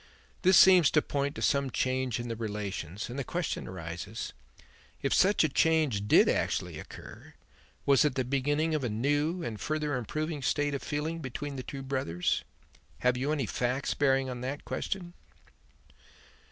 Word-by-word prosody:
This 185 -1 +6
seems 185 -5 +8
to 150 - +3
point 140 0 -2
to - - -4
some 140 -1 +2
change 130 -1 -1
in 120 - -4
the 115 - -3
relations, 105 -4 -4
and 125 +3 -5
the - - -1
question 175 +4 -3
arises: 90 +4 -6 0.7
if 135 - +1
such 195 0 +4
a - - +4
change 150 -9 +2
did - - +6
actually - - -1
occur, - - -11 0.5
was 140 +1 +5
it 150 -4 +1
the 130 - +1
beginning 145 +5 0
of 150 -3 0
a 125 - 0
new 145 +10 0
and 110 -8 -5
further 150 -2 -1
improving 155 +6 -3
state 145 +3 0
of 140 - -3
feeling 155 +3 -3
between 140 0 -5
the 130 - -4
two 135 +2 -7
brothers? 130 -11 -1 0.6
Have 125 0 +3
you 135 +4 -1
any 145 -5 0
facts 125 +5 -1
bearing 135 -1 +2
on 125 -1 -5
that 135 +3 -4
question?" 175 -3 -4
135 Hz, 165 wpm, -30 LUFS, 120-150 Hz, 0.7 s, seems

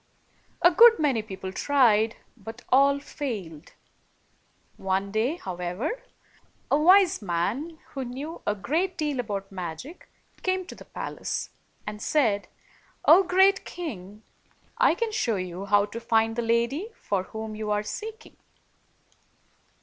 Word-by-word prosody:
A 350 - +8
good 465 +6 +8
many 275 -7 +1
people 190 -3 -7
tried, 225 -2 +3 0.2
but 225 +2 -10
all 275 +2 +5
failed. 205 - -6 1.0
One 195 +1 -1
day, 225 +9 0
however, 180 - -4 0.8
a - - +5
very 300 - +1
wise 375 -4 +6
man, 210 - -2
who 270 - -5
knew 270 +7 -7
a 205 - +1
great 325 - -1
deal 295 -4 -1
about 200 -4 -4
magic, 185 - -7 0.3
came 370 0 0
to - - -9
the - - -13
palace, - - -5 0.3
and 210 0 -6
said, 220 -10 +1 0.6
"O 340 +5 +8
great 385 +2 +4
king! 215 - -7 0.6
I - - +5
can 455 +3 -2
show 335 - 0
you 185 0 -5
how 205 0 +4
to 230 - -7
find 225 -1 +1
the 240 - -1
lady 235 - 0
for 200 -2 -2
whom 220 +1 -6
you 215 0 -4
are 210 0 +1
seeking." 445 - -8
230 Hz, 135 wpm, -26 LUFS, 200-310 Hz, 1.0 s, A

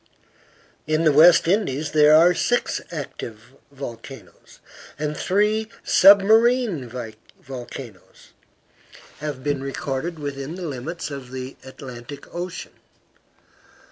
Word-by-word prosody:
In 155 +1 +1
the 155 - +5
West 165 +4 +6
Indies 160 -7 0
there 150 0 +6
are 170 +3 +6
six 245 +6 0
active 125 -7 -8 0.2
volcanoes; 120 - -10 0.4
and 150 0 -3
three 210 +6 +1 0.2
submarine 205 - +5 0.5
volcanoes 120 -5 -10 0.9
have 145 -3 -5
been 145 -2 -1
recorded 135 +4 -4
within 145 +1 -5
the 185 -1 -6
limits 150 +4 -5
of 135 -3 -8
the 130 0 -6
Atlantic 130 +1 -10
Ocean. 175 0 -6
150 Hz, 100 wpm, -22 LUFS, 130-175 Hz, 0.9 s, West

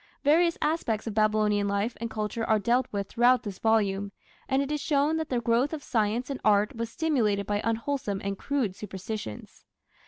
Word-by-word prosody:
Various 335 +4 +4
aspects 270 -9 0
of 225 - -3
Babylonian 215 -1 +2
life 200 +4 -1
and 230 - -2
culture 215 +1 -3
are 220 -1 +3
dealt 240 +5 +1
with 200 -1 -3
throughout 245 +3 +3
this 200 -3 -6
volume, 200 -3 +1 0.4
and 270 0 +2
it 280 - -5
is 300 -1 -1
shown 295 +2 +1
that 320 -1 -3
the 250 - +1
growth 235 +5 +1
of 300 -3 -5
science 230 +3 0
and 275 - -5
art 210 0 +3
was 230 0 -3
stimulated 230 -10 0
by 205 0 -1
unwholesome 230 -2 -1
and 200 0 -2
crude 245 -4 -1
superstitions. 205 - -7
225 Hz, 185 wpm, -27 LUFS, 205-265 Hz, 0.4 s, Various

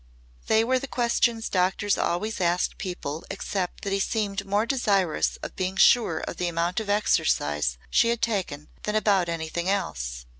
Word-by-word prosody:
They 220 0 +4
were 255 +2 +2
the 275 - -6
questions 235 -2 +1
doctors 190 +2 +1
always 200 +5 -1
asked 175 0 0
people 165 -4 -5
except 195 -2 -4
that 195 - -2
he 195 - +1
seemed 200 -1 -1
more 205 +3 +1
desirous 200 - +1
of - - -6
being 185 0 -2
sure 190 -8 +4
of - - -6
the 180 - -1
amount 170 +2 0
of 215 -2 -6
exercise 75 - +1
she 230 - +4
had 235 0 -1
taken 180 -10 -2
than 210 - -2
about 200 -5 +2
anything 165 +2 -3
else. 60 - -2
195 Hz, 165 wpm, -26 LUFS, 170-215 Hz, -, They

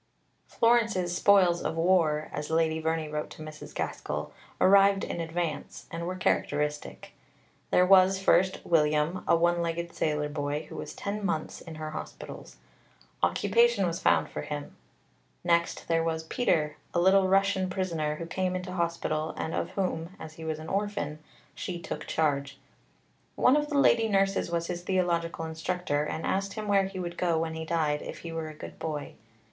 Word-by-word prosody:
Florence's 225 -7 +2
spoils 180 -3 +4
of - - -2
war, 165 -3 +2
as 150 0 -4
Lady 160 0 +2
Verney 160 0 -1
wrote 150 0 -4
to 155 - -10
Mrs. 155 0 -10
Gaskell, - - -3 0.3
arrived 195 0 +5
in 170 - -3
advance, 165 -2 -4
and 170 +1 -4
were 185 - -3
characteristic. 150 -4 -1 0.6
There 180 - +5
was, 190 0 +6
first, 190 -1 +2
William, 155 +1 +2
a - - +5
one 170 +1 +2
legged 170 0 -3
sailor 150 -1 0
boy, 145 0 -2
who - - -10
was - - -6
ten 205 +1 -4
months 160 -6 -2
in 165 -2 -9
her 155 0 -5
hospitals. - - -8 0.7
Occupation 205 - +3
was 170 -1 -2
found - - +3
for - - -5
him. 145 -1 -6 0.7
Next 170 -1 +1
there 165 -1 +2
was 160 -1 -1
Peter, 160 - 0 0.2
a - - +4
little 190 +2 +5
Russian 195 0 +2
prisoner 165 -5 -1
who 165 - -6
came 185 +2 -1
into 180 0 -4
hospital, 170 -3 -1
and 160 - -3
of - - -1
whom, 180 -2 -2
as 155 - -8
he 160 - -10
was 160 -1 -2
an 155 +1 -8
orphan, 195 -7 -2 0.3
she 180 -2 -5
took - - -6
charge. 140 -3 0 0.8
"One 255 - +5
of 295 0 0
the 290 - 0
Lady 230 -5 +5
Nurses 195 -2 +2
was 170 0 -1
his 175 0 -4
theological 175 -3 0
instructor, 160 -2 -1
and 160 - -4
asked 195 +1 -1
him 215 -1 -5
where 200 -1 +4
he 190 0 -7
would 175 -1 -5
go 170 -2 +2
when 160 0 -1
he 160 0 -5
died 155 -2 0
if - - -8
he 170 - -6
were 165 -1 -4
a 155 - -10
good - - -10
boy? 150 -3 -4
170 Hz, 175 wpm, -28 LUFS, 155-190 Hz, 0.8 s, was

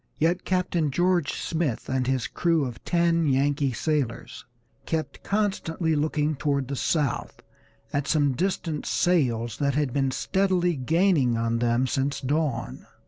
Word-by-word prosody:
Yet 170 +3 +1
Captain 180 -4 0
George 175 +1 +1
Smith, 160 -7 -2
and 130 -1 -1
his 130 -2 0
crew 165 -4 +1
of 120 -3 -7
ten 170 -2 +2
Yankee 140 +1 +1
sailors, 140 -2 -2 0.4
kept 160 -1 -3
constantly 190 -6 -1
looking 150 0 0
toward 140 -2 -1
the 140 - -2
south 145 -2 -1 0.5
at 145 0 -1
some 145 -4 +2
distant 165 0 -2
sails 120 - +1
that 140 -2 +1
had 145 -4 0
been 135 -1 +1
steadily 180 +3 +1
gaining 145 -3 +2
on 115 0 0
them 120 +2 +2
since 135 +2 -1
dawn. 145 -2 -2
150 Hz, 140 wpm, -26 LUFS, 130-170 Hz, 0.5 s, ten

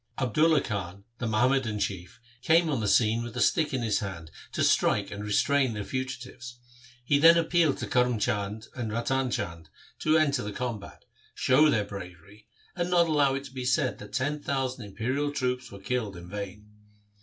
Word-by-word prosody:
Abdulla 150 +5 +3
Khan, 100 -3 -5 0.2
the 120 - -2
Muhammadan 115 0 +1
chief, 100 +1 -4 0.2
came 160 +3 +3
on 135 - 0
the 110 - -1
scene 110 +2 +3
with 120 -1 -7
a - - -1
stick 155 -3 +2
in 130 -3 -2
his 110 -3 +1
hand 85 -6 -6 0.2
to - - -1
strike - - +2
and 105 0 -6
restrain 130 +5 +2
the 105 -1 -4
fugitives. 130 0 -6 0.5
He 140 +2 +3
then 165 +3 +8
appealed 165 -2 +2
to - - -4
Karm 125 -2 +1
Chand 105 +1 -2
and 115 -4 -4
Ratan 130 +3 0
Chand 85 -8 -4 0.3
to 155 +1 +3
enter 145 -4 +2
the 105 -2 -5
combat, 115 -5 -6 0.3
show 150 +4 +4
their 105 -7 +1
bravery, 100 +2 -11 0.3
and 175 -1 -1
not 175 -1 +4
allow 145 -3 +3
it 135 - -4
to 135 -2 -11
be 130 -1 -5
said 130 +1 +1
that 105 0 -11
ten 145 +5 -1
thousand 130 -4 -2
imperial 130 +9 -2
troops 125 -2 -2
were 100 - -10
killed 105 -2 -3
in 85 0 -10
vain. 100 +2 -7
125 Hz, 185 wpm, -28 LUFS, 105-140 Hz, 0.5 s, then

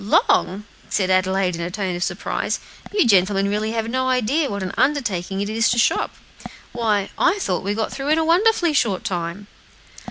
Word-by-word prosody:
"Long!" 200 -1 +2 0.3
said 190 -2 0
Adelaide, 185 0 +2
in 170 - -5
a 170 - -3
tone 185 -1 -3
of 175 - -6
surprise, 175 +1 -2 0.3
"you 410 -6 +3
gentlemen 195 -2 +3
really 210 +2 -1
have 225 -1 -2
no 260 +2 -1
idea 260 +4 +1
what 200 -1 -4
an 185 - -4
undertaking 200 -10 0
it 200 - -2
is 225 +2 +1
to 240 - +1
shop. 235 - +1 0.6
Why, 215 -4 0
I 390 - +3
thought 185 - -1
we 200 +2 -2
got 220 0 -2
through 275 0 -5
in 310 - +4
a 320 - +1
wonderfully 350 0 +3
short 210 -9 +1
time." 175 +2 -4
210 Hz, 190 wpm, -21 LUFS, 190-260 Hz, 0.6 s, in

